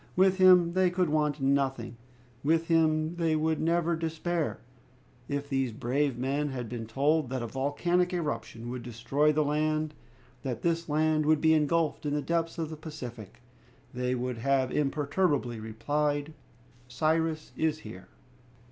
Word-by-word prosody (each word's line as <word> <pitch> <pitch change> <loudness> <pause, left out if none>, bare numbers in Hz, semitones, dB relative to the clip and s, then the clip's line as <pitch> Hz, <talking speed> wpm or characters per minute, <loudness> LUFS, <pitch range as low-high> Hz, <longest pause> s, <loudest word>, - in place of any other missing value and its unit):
With 190 +1 +4
him 180 -2 +6
they 185 0 +3
could 180 -1 0
want 150 -1 +1
nothing; 135 -3 0 0.5
with 165 +3 +1
him 160 0 +2
they 165 -2 +1
would 155 0 0
never 170 +1 +1
despair. 165 0 -2 0.7
If 145 0 -2
these 135 -3 0
brave 130 +4 -1
men 140 +4 -1
had 125 -3 -4
been 115 -1 -6
told 140 +4 +1
that 130 -2 -3
a - - -3
volcanic 175 - 0
eruption 150 -8 -4
would 125 -1 -5
destroy 125 +6 +1
the 155 0 +2
land, 155 +1 0 0.5
that 125 -4 -4
this 165 -1 0
land 155 0 +2
would 155 -1 +4
be 160 0 +4
engulfed 155 0 +1
in 145 - 0
the 150 - 0
depths 165 +3 -1
of 160 -1 -3
the 155 - -6
Pacific, 125 - -9 0.5
they 125 0 -1
would 125 -1 -3
have 135 +1 +1
imperturbably 145 -3 0
replied, 145 +7 -1 0.5
"Cyrus 155 +4 0
is 160 -1 0
here!" 95 -4 -10
150 Hz, 150 wpm, -29 LUFS, 130-160 Hz, 0.7 s, him